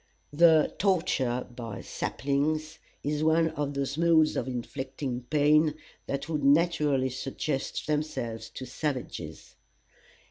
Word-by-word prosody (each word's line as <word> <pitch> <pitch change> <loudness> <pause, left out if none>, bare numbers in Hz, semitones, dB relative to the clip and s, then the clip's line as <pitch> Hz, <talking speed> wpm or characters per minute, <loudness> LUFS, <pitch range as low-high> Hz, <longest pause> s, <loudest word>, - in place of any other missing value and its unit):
The 160 0 +5
"torture 135 -10 +1
by 115 -5 -6
saplings" 155 +3 -2 0.2
is 150 +1 -1
one 160 +1 +4
of 145 -2 -3
those 140 +2 -2
modes 165 -2 +4
of 120 - -2
inflicting 130 0 -4
pain 150 +1 +4 0.3
that 140 0 -3
would 155 -3 -2
naturally 145 -3 +3
suggest 135 +2 -3
themselves 120 -7 -2
to 130 +3 -7
savages. 130 +1 -5
145 Hz, 110 wpm, -28 LUFS, 130-155 Hz, 0.3 s, The